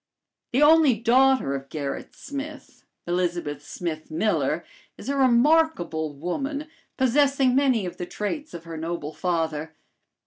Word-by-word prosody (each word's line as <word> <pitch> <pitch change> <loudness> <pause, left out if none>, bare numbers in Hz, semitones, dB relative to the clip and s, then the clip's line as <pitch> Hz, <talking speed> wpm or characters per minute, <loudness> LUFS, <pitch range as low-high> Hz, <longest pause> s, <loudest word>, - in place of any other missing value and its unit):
The 265 +5 +3
only 300 -5 +6
daughter 255 - +3
of 135 0 -5
Gerrit 140 -3 -5
Smith, 285 +1 -8 0.2
Elizabeth 175 -5 -2
Smith 155 -1 -5
Miller, 170 +7 0 0.3
is - - -7
a 280 - 0
remarkable 255 - +3
woman, 275 - -3 0.3
possessing 270 0 +3
many 260 -6 +3
of 180 0 -6
the 180 - -5
traits 295 - -4
of 170 - -8
her 165 -1 -7
noble 160 -1 -4
father. 160 -3 -2
210 Hz, 130 wpm, -25 LUFS, -, 0.3 s, only